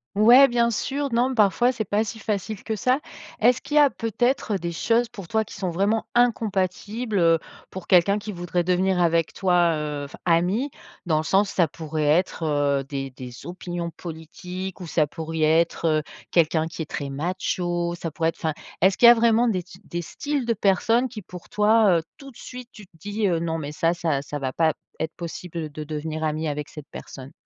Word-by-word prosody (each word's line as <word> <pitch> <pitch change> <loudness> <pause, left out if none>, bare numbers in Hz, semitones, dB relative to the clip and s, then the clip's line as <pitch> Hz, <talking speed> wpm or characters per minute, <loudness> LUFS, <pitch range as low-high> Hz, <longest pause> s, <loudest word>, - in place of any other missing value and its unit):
Ouais 240 +6 +8
bien 235 -2 +2
sûr, 280 +5 -2
non 245 +3 +1
parfois 240 +4 +3
c'est 225 - -2
pas 210 +2 0
si 220 +1 -6
facile 210 -1 -3
que 220 -1 -3
ça. 255 +7 +1 0.4
Est-ce 240 +2 +5
qu'il 295 - -5
y - - +7
a 290 - +6
peut-être 230 -1 -1
des 170 -2 -3
choses 230 +7 +1
pour 200 -7 -10
toi 220 +2 +1
qui - - -12
sont 185 -2 -2
vraiment 200 +6 +1
incompatibles, 215 -1 0
heu? 165 -1 +4 0.3
Pour 190 -2 -8
quelqu'un 190 +3 +4
qui 210 0 -6
voudrait 175 -1 -2
devenir 185 +1 +1
avec 165 -1 +2
toi, 175 -3 +2
heu, 150 -1 -3
enfin 140 - -11
ami? 185 +11 +1 0.3
Dans 160 -3 +2
le 155 - 0
sens 195 +4 +3
ça 175 -4 +2
pourrait 155 0 -4
être, 165 +3 +1
heu, 145 -3 +1
des 135 -1 -4
des 125 -1 -10
opinions 175 -1 -5
politiques 180 +3 -7
ou 180 - -7
ça 155 0 +2
pourrait 160 +1 +1
être, 170 0 -1 0.2
heu, - - -3 0.3
quelqu'un 160 -1 +2
qui 165 - -7
est 155 - -5
très 140 -1 -4
macho, 175 +3 -2
ça 165 - -3
pourrait 160 +1 0
être - - -7
enfin, 160 -1 -1 0.3
est-ce 190 +2 +3
qu'il 240 - +7
y - - +12
a - - +9
vraiment 230 +1 +3
des 185 -5 -1
t 180 - -15
des 175 - -4
styles 285 - -3
de 230 - +2
personnes 225 +5 +2
qui 220 -3 -8
pour 180 0 -11
toi, 210 -3 +4
heu, - - -7
tout 275 -2 -12
de 235 - -18
suite 250 -1 -9
tu 210 -3 -13
te 175 - -30
dis, 205 +5 -2
heu: 170 -3 +1
«Non 165 -1 -1
mais 150 -2 -5
ça, 165 +2 +1
ça 160 -5 -1
ça 145 +1 -6
va 130 -2 -3
pas 160 +2 +3 0.3
être 160 0 -3
possible, 170 0 -7
heu, 160 -2 -3
de 150 +1 -7
devenir 155 +1 -4
ami 155 +1 -1
avec 150 0 -4
cette 150 -2 -10
personne»? 135 0 -10
180 Hz, 215 wpm, -24 LUFS, 160-220 Hz, 0.4 s, y